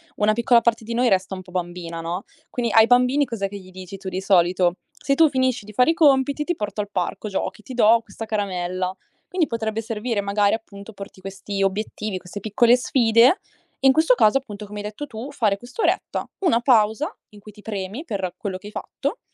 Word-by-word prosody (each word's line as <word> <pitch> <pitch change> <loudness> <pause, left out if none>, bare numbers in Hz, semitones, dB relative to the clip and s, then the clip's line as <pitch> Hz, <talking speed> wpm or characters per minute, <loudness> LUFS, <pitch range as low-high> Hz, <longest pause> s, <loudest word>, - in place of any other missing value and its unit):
una 210 +1 +2
piccola 235 +2 +4
parte 230 -1 +1
di 230 +2 -5
noi 245 +2 +2
resta 190 -2 +1
un 185 - -7
po' 180 - -16
bambina, 175 -2 -4
no, 175 +4 -4 0.3
quindi 235 -2 -2
ai 225 0 +7
bambini 250 +4 +4
cos'è 225 -6 -3
che 200 +1 -8
gli 185 -2 -13
dici 185 +1 -9
tu 190 0 -6
di 185 0 -3
solito? 180 -2 +3
"Se 290 -2 -1
tu 320 +1 +5
finisci 260 -5 0
di 215 - -10
fare 250 +8 +4
i - - 0
compiti, 280 -2 +3
ti 350 +3 -1
porto 210 0 -3
al 205 - -6
parco 195 +3 -3
giochi, 200 +2 -3
ti 260 - -9
do 230 -1 +5
questa 225 - -8
caramella." 185 -3 -2 0.4
Quindi 360 -4 +1
potrebbe 220 -1 -2
servire 225 0 -3
magari 200 0 +2
appunto 210 -1 -11
porti 200 -2 -11
questi 195 +1 -4
obiettivi, 205 0 -2
queste 185 +2 -9
piccole 235 +4 +4
sfide 245 - +4 0.4
e 270 - +3
in 265 - +7
questo 315 -3 +4
caso 225 +2 +4
appunto 210 -5 -9
come 210 0 -8
hai - - -5
detto 215 +8 -6
tu 240 +3 -7
fare 215 -7 +1
quest'oretta, 245 - -2
una 340 -11 +3
pausa 240 - +2
in 210 - -15
cui 210 +1 -13
ti 210 - -15
premi 205 +5 -5
per 195 - -3
quello 195 -3 -4
che 185 - -17
hai 210 - -11
fatto - - -4
215 Hz, 215 wpm, -23 LUFS, 195-245 Hz, 0.4 s, ai